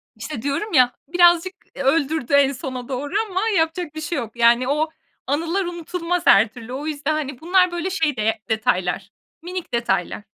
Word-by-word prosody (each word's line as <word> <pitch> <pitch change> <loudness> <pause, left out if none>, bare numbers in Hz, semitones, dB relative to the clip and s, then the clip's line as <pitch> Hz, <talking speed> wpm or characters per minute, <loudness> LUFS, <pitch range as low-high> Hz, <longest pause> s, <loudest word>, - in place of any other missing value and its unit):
İşte, 225 +3 -6
diyorum 285 - -2
ya, 250 -3 +5 0.2
birazcık, 350 +2 +4 0.2
eee, - - -4
öldürdü 285 0 +1
en 280 -1 +5
sona 255 -2 -6
doğru 280 +4 -4 0.2
ama 375 0 -1 0.2
yapacak 320 -1 -1
bir 315 - -5
şey 310 +1 -3
yok. 235 -3 -5
Yani, 235 +1 +4
o 300 +3 +1 0.4
anılar 330 +7 0
unutulmaz 345 0 -3
her 215 +3 +6
türlü. 240 +2 -10
O 290 +4 -5
yüzden, 300 0 -1
hani, 285 -4 -4
bunlar, 365 +2 +3
böyle, 345 +1 -2
şey 320 -6 0
değe 220 +1 0
detaylar, 195 -3 0 0.3
minik 355 -4 -6
detaylar. 205 -4 -1
290 Hz, 175 wpm, -22 LUFS, 245-340 Hz, 0.4 s, her